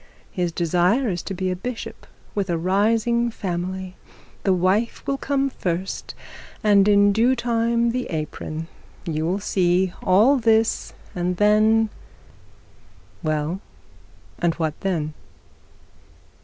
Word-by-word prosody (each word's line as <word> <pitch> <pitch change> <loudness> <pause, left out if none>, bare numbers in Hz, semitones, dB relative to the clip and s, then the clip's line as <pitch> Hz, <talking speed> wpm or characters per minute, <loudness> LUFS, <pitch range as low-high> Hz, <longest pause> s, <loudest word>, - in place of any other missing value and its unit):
His 175 -2 -1
desire 180 - +2
is 175 - -3
to 195 - -5
be 185 0 -1
a - - -1
bishop 230 +6 -7 0.3
with 200 -2 -2
a 170 - +1
rising 225 +6 +2
family, 185 -2 -4 0.4
the 195 - +1
wife 190 +5 +1
will 275 -1 -1
come 275 -1 0
first, 180 -3 -4 0.5
and 205 -2 +5
in 205 0 +5
due 235 +5 +3
time 235 -1 +1
the 250 +1 -2
apron. 155 0 -5 0.4
You 160 -2 -1
will 185 +3 0
see 185 -2 +1
all 215 +10 +5
this, 225 -2 +2 0.2
and 180 0 -2
then 215 +2 +4 0.6
' - - -29
'Well, 155 +3 -1 0.8
and 170 -1 +1
what 160 -2 -1
then?' 160 -6 -2
195 Hz, 125 wpm, -23 LUFS, 175-225 Hz, 0.8 s, and